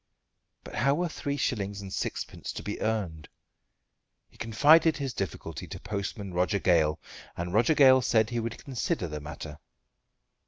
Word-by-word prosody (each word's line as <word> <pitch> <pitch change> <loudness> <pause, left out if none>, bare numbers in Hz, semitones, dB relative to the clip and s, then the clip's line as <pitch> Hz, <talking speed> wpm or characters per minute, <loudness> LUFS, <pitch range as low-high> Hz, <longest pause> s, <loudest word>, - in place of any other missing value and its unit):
But - - -10
how 140 +2 +2
were 175 +3 0
three 145 -2 -3
shillings 100 -7 -1
and 95 -1 -7
sixpence - - -4
to - - -6
be 105 - -5
earned? 95 -9 -2 1.0
He - - -24
confided 155 +8 +5
his 135 -4 -3
difficulty 95 -2 -5
to - - -7
postman 100 -1 -4
Roger 90 +4 +1
Gale, 80 -5 +2 0.4
and 90 +1 -3
Roger 115 +9 +4
Gale 130 -2 +7
said 110 -1 +2
he 120 - -1
would 115 +1 -4
consider 120 -8 -2
the 75 -1 -6
matter. 75 0 -8
105 Hz, 155 wpm, -28 LUFS, 90-130 Hz, 1.0 s, Gale